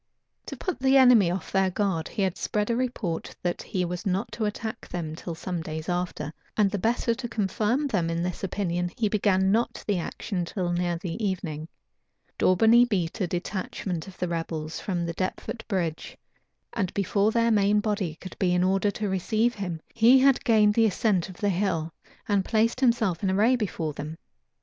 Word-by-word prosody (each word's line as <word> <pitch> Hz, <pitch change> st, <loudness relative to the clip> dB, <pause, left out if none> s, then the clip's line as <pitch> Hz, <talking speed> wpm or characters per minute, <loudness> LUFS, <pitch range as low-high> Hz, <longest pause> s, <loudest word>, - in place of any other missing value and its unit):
To -, -, -6 dB
put 370 Hz, -, -3 dB
the 265 Hz, +1 st, +4 dB
enemy 245 Hz, -8 st, +7 dB
off 185 Hz, +2 st, -4 dB
their 190 Hz, -1 st, +3 dB
guard, 185 Hz, -4 st, -1 dB
he 200 Hz, -, -2 dB
had 190 Hz, -1 st, 0 dB
spread 210 Hz, +2 st, -1 dB
a -, -, +1 dB
report 230 Hz, -9 st, -3 dB
that 175 Hz, -1 st, -1 dB
he 185 Hz, -1 st, -2 dB
was 180 Hz, 0 st, -4 dB
not 195 Hz, +3 st, -1 dB
to 215 Hz, +1 st, -2 dB
attack 220 Hz, +1 st, -4 dB
them 160 Hz, -3 st, -4 dB
till 170 Hz, 0 st, -6 dB
some 175 Hz, +1 st, -4 dB
days 155 Hz, 0 st, -6 dB
after; 175 Hz, -4 st, -2 dB, 0.2 s
and 205 Hz, -3 st, +3 dB
the 205 Hz, -, -2 dB
better 235 Hz, +3 st, +1 dB
to 240 Hz, 0 st, -6 dB
confirm 220 Hz, +5 st, 0 dB
them 185 Hz, -11 st, 0 dB
in 165 Hz, +1 st, -1 dB
this 180 Hz, +1 st, -4 dB
opinion, 175 Hz, -2 st, -1 dB
he 225 Hz, -, +2 dB
began 195 Hz, -2 st, +2 dB
not 230 Hz, +3 st, 0 dB
the 200 Hz, -4 st, 0 dB
action 180 Hz, +2 st, -3 dB
till 175 Hz, 0 st, -2 dB
near 175 Hz, 0 st, 0 dB
the 175 Hz, +5 st, -5 dB
evening. 170 Hz, -6 st, -3 dB, 0.7 s
Daubeney 225 Hz, +6 st, +6 dB
beat 180 Hz, -3 st, -1 dB
a 185 Hz, -, +1 dB
detachment 180 Hz, -1 st, -4 dB
of 190 Hz, -, -12 dB
the 180 Hz, -, -1 dB
rebels 165 Hz, -2 st, -4 dB
from 175 Hz, -3 st, -2 dB
Deptford 185 Hz, +6 st, -4 dB
bridge; 170 Hz, -7 st, -3 dB, 0.6 s
and 190 Hz, -5 st, -1 dB
before 200 Hz, +1 st, +2 dB
their 230 Hz, 0 st, +2 dB
main 205 Hz, -1 st, +4 dB
body 205 Hz, -6 st, -1 dB
could 185 Hz, -, -9 dB
be 180 Hz, -2 st, +2 dB
in 180 Hz, -, +2 dB
order 195 Hz, +2 st, +2 dB
to 210 Hz, +1 st, -3 dB
receive 215 Hz, +5 st, +1 dB
him, 180 Hz, -6 st, -4 dB
he 235 Hz, +3 st, +6 dB
had 270 Hz, 0 st, +4 dB
gained 215 Hz, -2 st, +4 dB
the 225 Hz, +1 st, +4 dB
ascent 195 Hz, -3 st, +1 dB
of 185 Hz, -, -11 dB
the 205 Hz, -, 0 dB
hill, 170 Hz, -4 st, -1 dB, 0.3 s
and 200 Hz, -2 st, +2 dB
placed 230 Hz, +4 st, +1 dB
himself 230 Hz, -9 st, +2 dB
in 195 Hz, -, +1 dB
array 215 Hz, +7 st, +4 dB
before 180 Hz, -9 st, -2 dB
them. 150 Hz, +3 st, -6 dB
195 Hz, 190 wpm, -26 LUFS, 175-220 Hz, 0.7 s, enemy